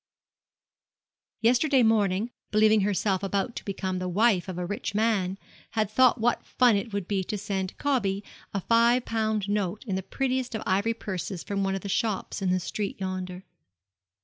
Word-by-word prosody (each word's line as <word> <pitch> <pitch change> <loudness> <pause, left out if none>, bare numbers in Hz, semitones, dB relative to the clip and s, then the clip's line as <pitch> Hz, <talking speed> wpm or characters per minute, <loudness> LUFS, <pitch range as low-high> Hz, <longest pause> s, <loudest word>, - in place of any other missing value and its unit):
Yesterday 255 +3 +4
morning, 215 0 +2 0.2
believing 215 0 +4
herself 195 -1 +1
about 200 +4 -1
to - - -6
become 190 -2 -3
the 180 0 -3
wife 200 -1 +3
of 185 -2 -5
a 180 - -2
rich 205 +2 -4
man, 205 -4 +1
she - - -30 0.3
had 215 -2 0
thought 255 +2 +4
what 235 +1 +1
fun 245 -3 +3
it 200 +3 -2
would 200 -3 -3
be 195 -2 0
to 210 - -3
send 190 -2 -3
'Cobby' 205 -9 0 0.3
a 195 - -2
five 235 +4 +3
pound 220 -2 -1
note 205 -1 -1
in 195 -5 -2
the 190 - -1
prettiest 255 +3 -2
of 220 - -3
ivory 200 +5 +1
purses 190 -4 -5
from 200 -1 -2
one 195 0 0
of 195 - -4
those 200 - -4
shops 210 -2 -1
in 190 - +1
the 185 0 +2
street 200 +3 -4
yonder. 185 -1 -4
205 Hz, 180 wpm, -27 LUFS, 190-225 Hz, 0.3 s, Yesterday